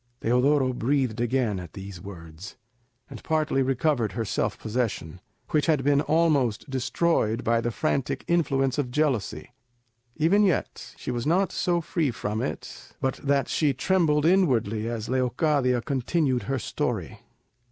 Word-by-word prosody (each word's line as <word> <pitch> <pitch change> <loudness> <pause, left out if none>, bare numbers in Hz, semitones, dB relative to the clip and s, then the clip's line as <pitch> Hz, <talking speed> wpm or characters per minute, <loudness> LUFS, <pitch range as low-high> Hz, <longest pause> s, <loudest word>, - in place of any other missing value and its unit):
Teodoro 130 +3 +2
breathed 125 -2 0
again 120 -5 0
at 90 -3 -9
these 95 -3 -8
words, 85 -1 -10 0.5
and 130 -6 -11
partly 155 -3 +1
recovered 130 -3 +1
her 115 -1 -2
self 95 - -1
possession, 105 -7 -3 0.3
which 150 0 +2
had 150 -5 +2
been 145 +1 +3
almost 150 -8 +1
destroyed 130 -3 0
by 115 0 +2
the 120 - -1
frantic 135 +3 -1
influence 135 -5 +1
of 135 -4 -1
jealousy. 125 -4 -1 0.6
Even 165 +7 +3
yet 190 -6 -1
she - - -5
was 120 +2 -3
not 185 +4 +2
so 175 -1 0
free 160 -2 -1
from 110 -2 -3
it 75 - -6
but 130 - -1
that 140 -1 +1
she 145 -4 +1
trembled 155 0 +2
inwardly 115 - +2
as 115 -2 -4
Leocadia 130 0 +1
continued 135 -1 0
her 135 - +1
story. 115 - -3
130 Hz, 140 wpm, -26 LUFS, 115-150 Hz, 0.6 s, been